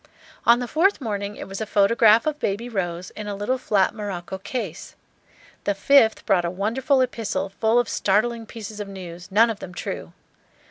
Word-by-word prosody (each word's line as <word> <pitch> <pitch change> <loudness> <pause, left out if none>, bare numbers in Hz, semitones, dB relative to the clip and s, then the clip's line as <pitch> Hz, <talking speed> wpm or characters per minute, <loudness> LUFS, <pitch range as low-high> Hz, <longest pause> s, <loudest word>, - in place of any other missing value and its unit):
On 235 +1 +7
the 245 0 -3
fourth 360 - +2
morning 205 -5 -3
it - - -8
was 195 +2 -6
a 220 - -3
photograph 215 +2 +5
of 305 -1 -1
Baby 205 +5 -2
Rose, 180 -4 -3
in 210 -1 -7
a 205 - -3
little 210 +6 -1
flat 200 -4 +2
morocco 190 -4 -5
case. 200 -4 -5 0.7
The 205 - +1
fifth 225 +2 +4
brought 180 -2 +3
a 170 - -1
wonderful 235 - +1
epistle, 230 -5 -2
full 220 +4 +1
of 245 -2 +3
startling 225 +4 0
pieces 215 -1 -8
of 205 - -4
news, 180 -3 -9
none 225 +4 +5
of 210 - -7
them 180 -1 -9
true. - - -5
210 Hz, 185 wpm, -23 LUFS, 195-235 Hz, 0.7 s, On